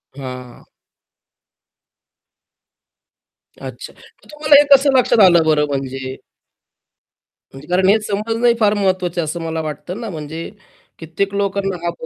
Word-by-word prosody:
हां. 125 Hz, -2 st, -9 dB, 3.0 s
अच्छा. -, -, -9 dB
मग -, -, -22 dB
तुम्हाला 300 Hz, -1 st, +3 dB
हे -, -, +3 dB
कसं 270 Hz, -1 st, +2 dB
लक्षात 240 Hz, -2 st, +2 dB
आलं 170 Hz, -3 st, +5 dB
बरं 150 Hz, -1 st, +2 dB
म्हणजे 135 Hz, -1 st, -5 dB, 1.4 s
म्हणजे 135 Hz, +2 st, -12 dB
कारण 185 Hz, +1 st, +1 dB
हे 220 Hz, +2 st, +4 dB
समजणं 225 Hz, +3 st, 0 dB
फार 210 Hz, -1 st, +3 dB
महत्त्वाचं 185 Hz, -3 st, -1 dB
आहे, -, -, -3 dB
असं 165 Hz, +2 st, -5 dB
मला 160 Hz, 0 st, -3 dB
वाटतं 160 Hz, +6 st, -7 dB
ना, 225 Hz, -, -5 dB
म्हणजे 160 Hz, 0 st, -7 dB, 0.5 s
कित्येक 180 Hz, +5 st, -3 dB
लोकांना 200 Hz, -1 st, -2 dB
हां, 170 Hz, -, 0 dB
180 Hz, 125 wpm, -18 LUFS, 150-205 Hz, 3.0 s, आलं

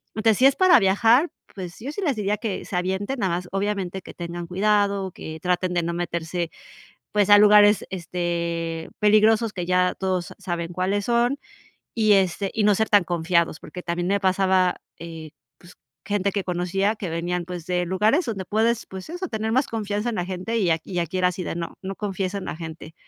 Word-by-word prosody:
Entonces, 220 Hz, -1 st, +3 dB
si 260 Hz, -, +4 dB
es 275 Hz, -, +6 dB
para 370 Hz, -4 st, +6 dB
viajar, 225 Hz, -, +4 dB, 0.3 s
pues 180 Hz, -3 st, -7 dB
yo 260 Hz, +6 st, -5 dB
sí 355 Hz, -, -5 dB
les 300 Hz, -8 st, +1 dB
diría 210 Hz, 0 st, 0 dB
que 215 Hz, -3 st, -4 dB
se -, -, -6 dB
avienten, 190 Hz, +8 st, -2 dB
nada 185 Hz, -5 st, +1 dB
más, 180 Hz, 0 st, -7 dB
obviamente, 195 Hz, -1 st, -2 dB
que -, -, -11 dB
tengan 175 Hz, 0 st, -6 dB
cuidado, 200 Hz, +1 st, +1 dB
que 160 Hz, -2 st, -8 dB
traten 180 Hz, 0 st, 0 dB
de 175 Hz, -1 st, +1 dB
no 170 Hz, +1 st, -2 dB
meterse, 170 Hz, 0 st, -3 dB, 0.6 s
pues, 205 Hz, -1 st, +2 dB
a 205 Hz, -, +9 dB
lugares, 210 Hz, 0 st, +6 dB
este, 170 Hz, -2 st, -3 dB
peligrosos 215 Hz, +1 st, +4 dB
que 180 Hz, -, -3 dB
ya 180 Hz, 0 st, +2 dB
todos 185 Hz, -2 st, -2 dB
sa -, -, -11 dB
saben 175 Hz, -3 st, -4 dB
cuáles 190 Hz, +3 st, -1 dB
son 240 Hz, +3 st, +2 dB, 0.6 s
y 215 Hz, -2 st, +4 dB
este, 195 Hz, 0 st, +1 dB
y 220 Hz, -, 0 dB
no 210 Hz, -, +5 dB
ser 220 Hz, +2 st, 0 dB
tan 205 Hz, -2 st, +5 dB
confiados, 170 Hz, -1 st, 0 dB
porque, 180 Hz, -, -9 dB
también 175 Hz, +1 st, -2 dB
me 200 Hz, +1 st, +2 dB
pasaba, 185 Hz, -1 st, +2 dB, 0.2 s
eh, 165 Hz, -2 st, -8 dB, 0.3 s
pues, 175 Hz, +1 st, -16 dB, 0.3 s
gente 200 Hz, 0 st, 0 dB
que 200 Hz, 0 st, -2 dB
conocía 185 Hz, +4 st, 0 dB
que 200 Hz, -4 st, -5 dB
venían, 175 Hz, +2 st, -2 dB
pues, 175 Hz, -2 st, -7 dB
de 180 Hz, -1 st, 0 dB
lugares 210 Hz, -, +2 dB
donde 205 Hz, -6 st, -4 dB
puedes, 225 Hz, +4 st, +1 dB
pues, 190 Hz, +5 st, -9 dB
eso 355 Hz, +3 st, -4 dB
tener 220 Hz, -4 st, -3 dB
más 260 Hz, +4 st, +2 dB
confianza 210 Hz, 0 st, -2 dB
en 235 Hz, -, -3 dB
la 180 Hz, -3 st, -2 dB
gente 190 Hz, +5 st, -3 dB
y 195 Hz, -6 st, +2 dB
a 160 Hz, -, +2 dB
y 180 Hz, -2 st, -3 dB
aquí 175 Hz, +2 st, -2 dB
era 180 Hz, 0 st, +3 dB
así 180 Hz, 0 st, -5 dB
de -, -, -4 dB
no 170 Hz, -1 st, -4 dB
no 195 Hz, +1 st, -5 dB
confíes 195 Hz, -2 st, -3 dB
en 200 Hz, -, -4 dB
la -, -, -4 dB
gente. 160 Hz, 0 st, -9 dB
190 Hz, 210 wpm, -24 LUFS, 175-210 Hz, 0.6 s, a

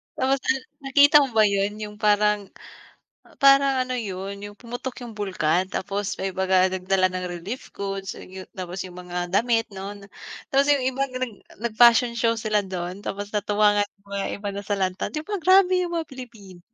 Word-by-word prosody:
Tapos, 270 Hz, +1 st, +1 dB
ah, 265 Hz, -, +2 dB, 0.3 s
nakita 285 Hz, +2 st, +6 dB
mo -, -, -7 dB
ba 220 Hz, -, +6 dB
'yon? 200 Hz, 0 st, +1 dB
'Yong 210 Hz, 0 st, -7 dB
parang 210 Hz, -1 st, +2 dB, 0.9 s
parang 275 Hz, 0 st, +6 dB
ano 255 Hz, 0 st, -4 dB
'yon, 195 Hz, -4 st, -4 dB
'yong 205 Hz, 0 st, -9 dB
pumutok 245 Hz, +1 st, -6 dB
'yong 240 Hz, -2 st, -8 dB
bulkan. 185 Hz, -3 st, 0 dB
Tapos 200 Hz, +1 st, -3 dB
may 190 Hz, -1 st, -3 dB
mga 190 Hz, 0 st, +3 dB
nagdala 185 Hz, 0 st, +2 dB
ng 185 Hz, 0 st, -3 dB
relief 185 Hz, +9 st, -6 dB
goods, 195 Hz, -1 st, -5 dB
and -, -, -11 dB
'yong 190 Hz, 0 st, -9 dB
tapos 185 Hz, 0 st, -6 dB
'yong 180 Hz, -1 st, -10 dB
mga 180 Hz, 0 st, -4 dB
damit, 225 Hz, +3 st, +2 dB
'no, 195 Hz, +1 st, -7 dB
na 200 Hz, -1 st, -13 dB, 0.4 s
tapos 275 Hz, +1 st, +3 dB
'yong 280 Hz, -2 st, +1 dB
iba 270 Hz, +1 st, -1 dB
nag 255 Hz, -1 st, -6 dB, 0.4 s
nag-fashion 235 Hz, +1 st, +5 dB
show 230 Hz, 0 st, +2 dB
sila 215 Hz, -2 st, 0 dB
do'n. 185 Hz, 0 st, -5 dB
Tapos 205 Hz, +1 st, -5 dB
natuwa 210 Hz, 0 st, +2 dB
nga 205 Hz, -, +3 dB
'yong 200 Hz, 0 st, -38 dB
mga 200 Hz, 0 st, -2 dB
ibang 200 Hz, -1 st, -4 dB
nasalanta. 195 Hz, -2 st, -2 dB
'Di 305 Hz, -, -3 dB
ba 405 Hz, +5 st, -3 dB
grabe 370 Hz, +2 st, +5 dB
'yong 355 Hz, -1 st, -2 dB
mga 330 Hz, -2 st, -2 dB
Pilipino, 225 Hz, -9 st, -11 dB
205 Hz, 185 wpm, -24 LUFS, 190-250 Hz, 0.9 s, nakita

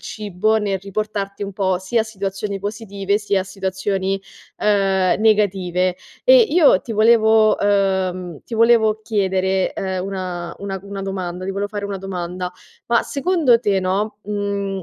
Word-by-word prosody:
cibo 215 Hz, +1 st, -1 dB
nel 200 Hz, -3 st, -1 dB
riportarti 200 Hz, +1 st, -4 dB
un 200 Hz, 0 st, -4 dB
po' 190 Hz, -1 st, 0 dB
sia 190 Hz, +5 st, 0 dB
a 220 Hz, -, 0 dB
situazioni 200 Hz, -1 st, -4 dB
positive 200 Hz, -1 st, -2 dB
sia 205 Hz, -2 st, 0 dB
a -, -, -11 dB
situazioni, 190 Hz, 0 st, -2 dB, 0.4 s
uhm, 195 Hz, -3 st, +2 dB
negative. 185 Hz, -4 st, +2 dB, 0.3 s
E -, -, +8 dB
io 345 Hz, -, +5 dB
ti 230 Hz, -, -6 dB
volevo 220 Hz, 0 st, +5 dB
uhm, 190 Hz, -4 st, 0 dB
ti 230 Hz, -, -6 dB
volevo 220 Hz, -1 st, +3 dB
chiedere, 190 Hz, -3 st, 0 dB
ehm, 190 Hz, -1 st, -3 dB
una 180 Hz, -3 st, -5 dB
una 195 Hz, -1 st, -4 dB
c -, -, -20 dB
una 200 Hz, -1 st, -6 dB
domanda 185 Hz, -2 st, -4 dB
ti 190 Hz, -, -2 dB
volevo 200 Hz, +1 st, -2 dB
fare 205 Hz, -1 st, -5 dB
una 200 Hz, -1 st, -4 dB
domanda. 180 Hz, -1 st, -4 dB, 0.4 s
Ma 235 Hz, 0 st, +3 dB
secondo 285 Hz, -5 st, +2 dB
te, 205 Hz, -4 st, +1 dB
no, 195 Hz, +4 st, -1 dB
mhmm, 200 Hz, -1 st, -3 dB
200 Hz, 155 wpm, -20 LUFS, 190-215 Hz, 0.4 s, E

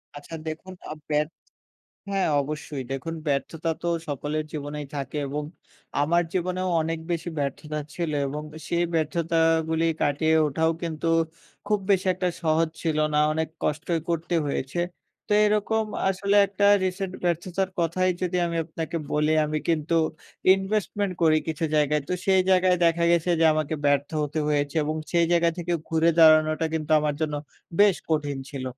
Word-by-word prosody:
আচ্ছা 145 Hz, +3 st, -8 dB
দেখুন 160 Hz, +4 st, -6 dB, 0.2 s
আ -, -, -2 dB, 0.2 s
ব্যা 150 Hz, 0 st, +3 dB, 0.9 s
হ্যাঁ 195 Hz, -3 st, +1 dB
অবশ্যই 150 Hz, -1 st, -5 dB
দেখুন 135 Hz, +5 st, -4 dB
ব্যর্থতা 155 Hz, +3 st, -1 dB
তো 175 Hz, -, -1 dB, 0.2 s
সকলের 145 Hz, +2 st, -2 dB
জীবনেই 145 Hz, -1 st, -5 dB
থাকে 140 Hz, +1 st, -4 dB
এবং 150 Hz, +2 st, -3 dB, 0.6 s
আমার 170 Hz, +4 st, +3 dB
জীবনেও 185 Hz, 0 st, -1 dB
অনেক 165 Hz, +1 st, -2 dB
বেশি 170 Hz, 0 st, -2 dB
ব্যর্থতা 150 Hz, +2 st, -3 dB, 0.2 s
ছিল। 170 Hz, -3 st, -2 dB, 0.2 s
এবং 150 Hz, +2 st, -4 dB
এ -, -, -7 dB
সেই 170 Hz, 0 st, +1 dB
ব্যর্থতাগুলি 165 Hz, 0 st, +1 dB, 0.2 s
কাটিয়ে 155 Hz, +3 st, +2 dB
ওঠাও 160 Hz, +3 st, +1 dB
কিন্তু 165 Hz, -1 st, -2 dB, 0.6 s
খুব 210 Hz, 0 st, +2 dB
বেশি 190 Hz, -1 st, +3 dB
একটা 180 Hz, 0 st, -1 dB
সহজ 160 Hz, 0 st, +2 dB
ছিল 160 Hz, -2 st, 0 dB, 0.2 s
না। -, -, +3 dB
অনেক 160 Hz, +1 st, -1 dB
কষ্টই 160 Hz, +2 st, -1 dB
করতে 170 Hz, +1 st, -1 dB
হয়েছে। 140 Hz, +3 st, -2 dB, 0.5 s
তো -, -, 0 dB
এরকম 215 Hz, +1 st, +1 dB, 0.2 s
আসলে 200 Hz, +2 st, +1 dB
একটা 200 Hz, +1 st, +1 dB, 0.2 s
রিসেন্ট 185 Hz, 0 st, -2 dB
ব্যর্থতার 180 Hz, +2 st, -1 dB
কথাই 185 Hz, +3 st, +1 dB
যদি 180 Hz, 0 st, 0 dB
আমি 170 Hz, 0 st, -3 dB
আপনাকে 165 Hz, +1 st, -5 dB, 0.2 s
বলি, 150 Hz, +1 st, +2 dB
আমি 155 Hz, 0 st, -1 dB
কিন্তু 165 Hz, 0 st, +1 dB, 0.6 s
ইনভেস্টমেন্ট 200 Hz, 0 st, -1 dB
করি 155 Hz, -1 st, +5 dB
কিছু 160 Hz, 0 st, -2 dB
জায়গায়। 150 Hz, 0 st, +2 dB
তো -, -, -1 dB
সেই 190 Hz, -1 st, +5 dB
জায়গায় 185 Hz, -1 st, +4 dB
দেখা 170 Hz, 0 st, +3 dB
গেছে 170 Hz, +1 st, +2 dB
যে -, -, +5 dB
আমাকে 155 Hz, 0 st, -1 dB
ব্যর্থ 145 Hz, 0 st, +2 dB
হতে 150 Hz, +1 st, -3 dB
হয়েছে 145 Hz, -1 st, 0 dB
এবং 155 Hz, +1 st, -2 dB, 0.2 s
সেই 170 Hz, -1 st, +4 dB
জায়গা 170 Hz, -1 st, +4 dB
থেকে 175 Hz, 0 st, -2 dB, 0.2 s
ঘুরে 165 Hz, +1 st, +3 dB
দাঁড়ানোটা 155 Hz, 0 st, +6 dB
কিন্তু 155 Hz, -1 st, -3 dB
আমার 150 Hz, -1 st, 0 dB
জন্য 155 Hz, -1 st, -1 dB, 0.5 s
বেশ 205 Hz, -3 st, +6 dB
কঠিন 145 Hz, -3 st, 0 dB
ছিল। 135 Hz, -3 st, -5 dB
160 Hz, 155 wpm, -25 LUFS, 150-175 Hz, 0.9 s, দাঁড়ানোটা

